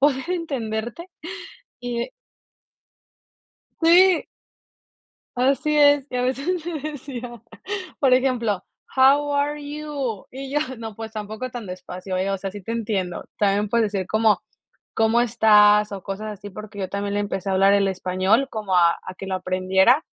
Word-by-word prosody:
poder 280 +3 +2
entenderte", 275 -1 -3 0.7
y 240 - -3 1.7
Sí. 355 +2 +6 1.1
Así 275 +4 +2
es. 290 -2 +5
Y 250 - -3
a 250 - 0
veces 285 +7 -1
me 335 -3 -4
decía, 270 -4 -6 0.7
por 265 -3 +5
ejemplo, 245 -6 +1 0.3
How 285 +2 +5
are 290 +1 0
you? 285 -7 -4
Y 265 +1 -7
yo: 295 +1 +1 0.2
"No, 225 -2 -7
pues, 225 -1 -7
tampoco 215 +4 -5
tan 240 -3 -7
despacio, 185 0 -6
¿eh? 190 +2 0
O 195 - -1
sea, 195 +1 -4
sí 205 0 -9
te 230 - -5
entiendo. 200 -6 -2
También 205 0 +2
puedes 220 -1 +1
decir: 190 -3 -2 0.9
¿cómo 225 +1 +3
estás?, 210 -2 +5
o 195 -2 -6
cosas 200 +3 -5
así". 205 0 -9
Porque 215 +1 -10
yo 190 -1 -2
también, 200 +1 -3
le 205 - +1
empecé 200 -1 -3
a - - +1
hablar 195 +1 +5
el 200 -1 +3
español, 190 +7 +1
como 210 -4 -3
a 170 -1 +6
a 185 - -8
que 195 - -8
lo 190 - -2
aprendiera. 190 +8 +3
225 Hz, 155 wpm, -23 LUFS, 200-275 Hz, 1.7 s, Sí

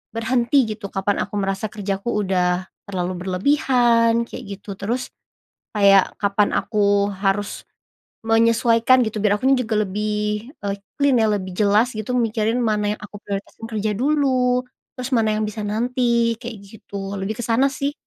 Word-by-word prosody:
"berhenti," 240 +2 +2
gitu 210 -1 -6
kapan 195 +1 0
aku 205 - -24
merasa 195 +2 -2
kerjaku 200 +1 -3
udah 180 -1 0 0.2
terlalu 185 -2 -2
berlebihan 235 +1 +3
kayak - - -8 0.2
gitu 200 -1 -8
terus, 235 +6 -2 0.7
kayak 195 -1 +5
kapan 200 0 +2
aku 205 -1 +2
harus, 195 +1 -1 0.6
menyesuaikan 230 +2 +4
gitu 220 - -4
biar 210 -1 +3
akunya 265 +1 +4
juga 215 -1 0
lebih, 210 +3 -2
eee, 200 0 -1 0.2
clean 280 -3 +3
ya 220 - +3
lebih 190 -3 -2
jelas 215 +4 +3
gitu 215 +3 -3
mikirin 225 0 0
mana 210 -2 +1
yang - - -27
aku 205 - -10
prioritasin 200 +2 -6
kerja 215 -1 -1
dulu, 255 -2 +2 0.3
terus 255 +1 -4
mana 215 -1 +2
yang 215 - 0
bisa 215 0 -5
nanti 235 +1 +1
kayak 235 -2 -6
gitu 200 -2 -7
lebih 205 +3 -2
ke 240 - -3
sana 245 +4 +3
sih. 280 +1 -2
215 Hz, 155 wpm, -21 LUFS, 200-240 Hz, 0.7 s, kayak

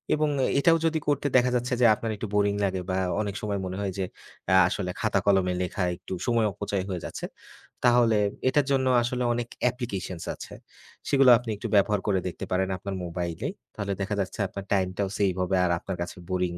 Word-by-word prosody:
এবং 155 0 +1 0.3
এটাও 165 +3 +5
যদি 160 -1 +2
করতে 145 -1 +1
দেখা 125 0 +3
যাচ্ছে 125 +1 -1
যে - - +6
আপনার 110 +1 -4
একটু 110 - -4
boring 100 0 +2
লাগে 95 -1 -1
বা 95 - 0 0.2
অনেক 100 -2 -3
সময় 105 -3 -2
মনে 95 0 -4
হয় 100 - -1
যে, 95 - 0 0.4
অ্যা 95 0 +5
আসলে 90 -1 -2
খাতা-কলমে 100 -3 +2
লেখা 90 +1 -2
একটু 90 +1 -8
সময় 115 -2 +3
অপচয় 100 -1 -2
হয়ে 90 -3 -4
যাচ্ছে, - - -5 0.6
তাহলে 120 -3 +5 0.3
এটার 145 0 +2
জন্য 130 -1 +2 0.2
আসলে 125 +1 -1
অনেক 120 0 -2 0.2
applications 100 -8 -5
আছে। - - -10 0.6
সেগুলো 135 -2 +5
আপনি 120 -2 -8
একটু - - -4
ব্যবহার 100 0 +4
করে 95 -2 +2
দেখতে 90 - -5
পারেন 95 +1 +1
আপনার 95 +1 -5
মোবাইলেই। 85 -1 -3 0.2
তাহলে 100 -1 -2
দেখা 105 +2 -1
যাচ্ছে 95 - -5
আপনার 100 +1 -7
time-টাও 95 +1 0
save 95 -3 +1
হবে 95 +1 0
আর 90 - +1
আপনার 95 0 -5
কাছে 85 +1 -5
boring 90 -1 -1
100 Hz, 190 wpm, -26 LUFS, 95-120 Hz, 0.6 s, যে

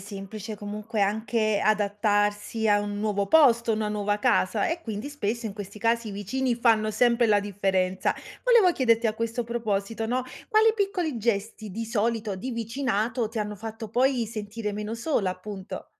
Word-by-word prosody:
semplice 205 +2 -7
comunque 210 +1 -5
anche 215 +1 +1
adattarsi 205 +1 +1
a 205 0 +5
un 205 0 -4
nuovo 205 -2 0
posto, 235 -4 +5
una 215 -1 -1
nuova 205 0 -1
casa 205 0 +2
e 335 +1 -3
quindi 220 +1 -5
spesso 235 -5 -3
in 205 - -6
questi 205 0 -8
casi 230 +1 +1
i - - -5
vicini 240 +6 -1
fanno 225 -2 +3
sempre 235 +2 +3
la 205 -2 +4
differenza. 190 -2 0 0.3
Volevo 470 -7 +6
chiederti 230 -3 +3
a 215 - 0
questo 230 +1 -2
proposito, 225 -2 -2
no, 250 +2 -1 0.3
quali 440 0 +5
piccoli 370 - -1
gesti, 215 -1 -2
di 225 +4 -4
solito, 220 -2 -1
di 250 +8 -5
vicinato 230 -1 -1
ti 230 - -4
hanno 210 0 -3
fatto 225 +1 -7
poi 250 +1 +2
sentire 210 0 -5
meno 210 +2 -4
sola 230 - 0
appunto? 190 +1 -7
220 Hz, 165 wpm, -26 LUFS, 205-235 Hz, 0.3 s, Volevo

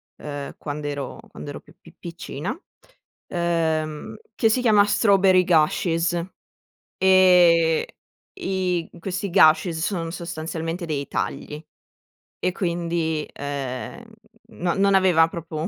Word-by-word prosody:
uhm, 145 -1 -7
quand'ero 145 -1 -5
quando 145 - -9
ero 145 - -7
più - - -21
pi 165 - -17
piccina, 170 - -6 0.7
uhm, 160 -3 -1 0.2
che 225 - +2
si 250 +3 +1
chiama 210 -4 +5
Strawberry 195 -3 +4
Gashes, 165 0 +2 0.9
ehm, 180 -3 +5 0.6
i 185 - -1
questi 190 +3 -4
gashes, 165 -1 +4
son 165 -1 -2
sostanzialmente 165 0 -5
dei 145 -3 -3
tagli 150 +2 -4 0.8
e 185 - 0
quindi, 170 -3 -2
ehm, 140 - -5 0.5
no 175 -1 -1
non 195 0 +3
aveva 180 -4 +5
proprio 165 0 -5
170 Hz, 105 wpm, -23 LUFS, 155-185 Hz, 0.9 s, chiama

